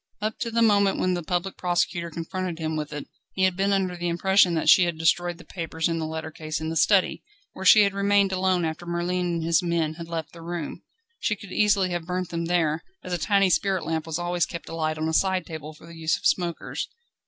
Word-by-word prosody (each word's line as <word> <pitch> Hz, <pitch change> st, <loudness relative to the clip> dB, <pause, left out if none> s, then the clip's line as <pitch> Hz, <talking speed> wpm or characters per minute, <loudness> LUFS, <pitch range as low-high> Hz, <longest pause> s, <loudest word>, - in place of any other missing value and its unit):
Up 215 Hz, +1 st, -3 dB
to 230 Hz, -, -2 dB
the 230 Hz, 0 st, +2 dB
moment 200 Hz, -3 st, +4 dB
when 185 Hz, -, +1 dB
the 175 Hz, -, -2 dB
Public 180 Hz, +3 st, -2 dB
Prosecutor 175 Hz, -1 st, 0 dB
confronted 170 Hz, +2 st, -4 dB
him 160 Hz, -1 st, -2 dB
with 150 Hz, -1 st, -4 dB
it, 145 Hz, -1 st, -6 dB, 0.3 s
he 190 Hz, -, 0 dB
had 185 Hz, -1 st, +3 dB
been 195 Hz, +2 st, +1 dB
under 190 Hz, -2 st, +1 dB
the 175 Hz, 0 st, -3 dB
impression 180 Hz, +1 st, +3 dB
that 160 Hz, -, -1 dB
she 180 Hz, -, +7 dB
had 170 Hz, -2 st, -2 dB
destroyed 170 Hz, +2 st, +1 dB
the 175 Hz, -, -14 dB
papers 165 Hz, -2 st, -3 dB
and 165 Hz, -1 st, -1 dB
the 160 Hz, -, -2 dB
letter 160 Hz, 0 st, -5 dB
case 155 Hz, 0 st, -4 dB
in 160 Hz, 0 st, -3 dB
the 165 Hz, -, -3 dB
study, 190 Hz, +4 st, +3 dB, 0.3 s
where 190 Hz, -, -7 dB
she 210 Hz, +2 st, +8 dB
had 200 Hz, -1 st, +1 dB
remained 200 Hz, 0 st, +3 dB
alone 185 Hz, -2 st, +1 dB
after 160 Hz, +2 st, -5 dB
Merlin 175 Hz, +1 st, -1 dB
and 170 Hz, -1 st, -2 dB
his 165 Hz, -1 st, +3 dB
men 170 Hz, -3 st, 0 dB
had 165 Hz, +1 st, -8 dB
left 165 Hz, -2 st, -5 dB
the 170 Hz, -, -11 dB
room. 170 Hz, -2 st, -5 dB, 0.4 s
She 210 Hz, -, 0 dB
could 195 Hz, -1 st, -12 dB
easily 200 Hz, -2 st, +2 dB
have 175 Hz, -1 st, -3 dB
burnt 180 Hz, -1 st, -2 dB
them 170 Hz, 0 st, -3 dB
there, 165 Hz, -2 st, +1 dB, 0.2 s
as 180 Hz, -, -5 dB
a 175 Hz, -, -1 dB
tiny 195 Hz, +3 st, +3 dB
spirit 190 Hz, -3 st, +1 dB
lamp 160 Hz, 0 st, -2 dB
was 160 Hz, -1 st, -2 dB
always 175 Hz, 0 st, 0 dB
kept 170 Hz, -, -7 dB
alight 155 Hz, -1 st, -2 dB
on 155 Hz, 0 st, -1 dB
a 160 Hz, -, -1 dB
side 185 Hz, 0 st, +2 dB
table 155 Hz, -2 st, -7 dB
for 155 Hz, -, -16 dB
the 170 Hz, 0 st, -12 dB
use 160 Hz, -1 st, 0 dB
of -, -, -13 dB
smokers. 175 Hz, -2 st, -1 dB
175 Hz, 245 wpm, -25 LUFS, 160-185 Hz, 0.4 s, she